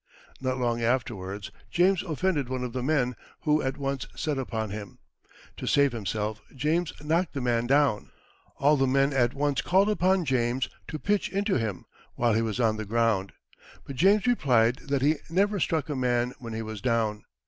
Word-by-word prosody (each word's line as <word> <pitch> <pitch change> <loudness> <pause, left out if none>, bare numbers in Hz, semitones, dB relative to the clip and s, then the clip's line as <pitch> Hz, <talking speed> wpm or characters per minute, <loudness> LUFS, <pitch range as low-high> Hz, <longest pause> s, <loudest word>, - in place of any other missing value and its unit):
Not 130 -1 -1
long 120 -2 0
afterwards 105 -5 -2 0.2
James 180 +1 +3
offended 160 -5 -1
one 130 -1 -2
of 125 -2 -4
the 130 - -2
men, 125 -3 +1 0.3
who 150 0 +2
at 130 +1 -2
once 135 -1 -3
set 150 -3 -2
upon 110 -5 -3
him. 105 -1 -7 0.6
To - - -6
save 140 -1 +4
himself, 110 -1 -3
James 155 +5 0
knocked 165 +3 0
the 140 - -3
man 120 -2 0
down. 140 -5 +2 0.5
All 145 +2 +4
the 135 0 +2
men 135 +2 +2
at 125 -2 +2
once 145 0 0
called 195 +3 +3
upon 190 -2 +2
James 125 -1 +1 0.2
to 155 - -4
pitch 205 +5 0
into 200 -4 0
him 105 -5 -3 0.3
while 120 -2 +2
he 110 - +2
was 115 0 -2
on 110 -3 +2
the 110 - -3
ground. 110 -3 +1 0.5
But 140 - -7
James 195 +9 +4
replied 125 - +3
that 140 -2 0
he 150 +2 +3
never 200 +4 +1
struck 160 -3 0
a 150 - -3
man 125 -1 0
when 115 -2 -7
he 110 0 -3
was 110 -2 -7
down. 115 -4 0
130 Hz, 185 wpm, -27 LUFS, 115-150 Hz, 0.6 s, save